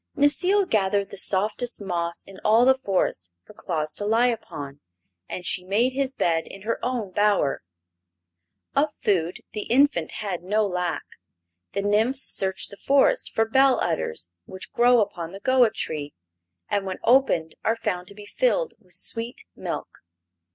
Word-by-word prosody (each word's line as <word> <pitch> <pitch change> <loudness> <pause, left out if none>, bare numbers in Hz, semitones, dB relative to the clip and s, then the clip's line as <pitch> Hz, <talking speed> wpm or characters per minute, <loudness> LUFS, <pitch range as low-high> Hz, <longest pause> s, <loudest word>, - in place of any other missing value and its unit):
Necile 360 +8 +3
gathered 200 -1 +1
the 200 - -8
softest 210 +6 +1
moss 170 -4 -3
in 195 -1 -13
all 225 +3 +5
the 265 - +7
forest 195 - -1 0.2
for - - -15
Claus 155 -3 -2
to - - -4
lie 225 +4 +3
upon, 145 - -6 0.5
and 180 - -6
she 180 - +1
made 220 +7 +1
his 275 0 -1
bed 165 -1 0
in 195 - -11
her 230 +2 -2
own 240 -6 -2
bower. 205 -7 +1 1.1
Of 295 +2 +3
food 175 -4 0
the 210 -1 -4
infant 245 - +2
had 195 -5 -4
no 210 +4 +1
lack. 180 -3 -2 0.7
The 200 - -1
nymphs 225 +6 +3
searched 190 -1 +2
the 200 - -11
forest 280 - +2
for 225 - +3
bell 265 +3 +4
udders, 90 - -2
which 190 - -9
grow 240 0 +5
upon 170 -4 -4
the 195 - -8
goa 255 +1 +4
tree 150 -9 -4 0.5
and 200 -1 -1
when 185 - -4
opened 235 -11 +3
are 225 - +2
found 180 -5 -3
to 200 - -13
be 210 0 -11
filled - - 0
with 185 -5 -18
sweet 230 +1 -4
milk. - - -6
205 Hz, 160 wpm, -24 LUFS, 180-245 Hz, 1.1 s, the